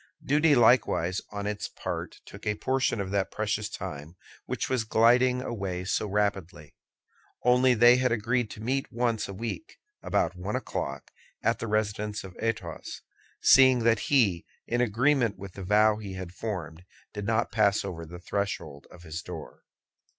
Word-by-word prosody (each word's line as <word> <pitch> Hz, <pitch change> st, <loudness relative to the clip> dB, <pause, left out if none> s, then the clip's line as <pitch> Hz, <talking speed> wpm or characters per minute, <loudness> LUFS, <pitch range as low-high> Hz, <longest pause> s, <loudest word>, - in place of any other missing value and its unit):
Duty 150 Hz, +1 st, +4 dB
likewise 110 Hz, -7 st, +3 dB
on 100 Hz, -1 st, -4 dB
its 105 Hz, 0 st, -3 dB
part -, -, -6 dB
took -, -, -10 dB
a 105 Hz, -, +1 dB
portion 130 Hz, 0 st, 0 dB
of 95 Hz, -1 st, -3 dB
that 100 Hz, -1 st, 0 dB
precious 105 Hz, 0 st, -2 dB
time 80 Hz, -5 st, -7 dB, 0.3 s
which -, -, -2 dB
was 130 Hz, -3 st, 0 dB
gliding 125 Hz, +3 st, +3 dB
away 95 Hz, -7 st, -4 dB
so 105 Hz, -, 0 dB
rapidly—only 100 Hz, -, -1 dB
they 120 Hz, +2 st, +7 dB
had 125 Hz, -1 st, +1 dB
agreed 115 Hz, +1 st, 0 dB
to 110 Hz, -, -9 dB
meet 135 Hz, +3 st, -1 dB
once 120 Hz, -2 st, 0 dB
a 100 Hz, -, -7 dB
week, 115 Hz, -, -6 dB, 0.2 s
about -, -, 0 dB
one -, -, -4 dB
o'clock, -, -, -4 dB, 0.3 s
at -, -, +1 dB
the 115 Hz, -, -4 dB
residence 105 Hz, 0 st, -1 dB
of 95 Hz, -2 st, -10 dB
Athos, 110 Hz, -7 st, -4 dB, 0.4 s
seeing 130 Hz, -3 st, +6 dB
that 115 Hz, 0 st, +3 dB
he, 105 Hz, -12 st, +3 dB, 0.2 s
in 120 Hz, +1 st, 0 dB
agreement 120 Hz, 0 st, +2 dB
with 100 Hz, -1 st, -9 dB
the 95 Hz, -, -8 dB
vow 105 Hz, +3 st, +4 dB
he 100 Hz, -3 st, -7 dB
had 95 Hz, -2 st, -7 dB
formed, 90 Hz, -6 st, -5 dB, 0.3 s
did 105 Hz, -1 st, -5 dB
not 115 Hz, +1 st, +1 dB
pass 100 Hz, -2 st, +2 dB
over 85 Hz, -4 st, -5 dB
the 85 Hz, +2 st, -9 dB
threshold 90 Hz, -6 st, -4 dB
of 85 Hz, -, -15 dB
his 80 Hz, 0 st, -6 dB
door. -, -, -9 dB
105 Hz, 160 wpm, -28 LUFS, 95-120 Hz, 0.4 s, they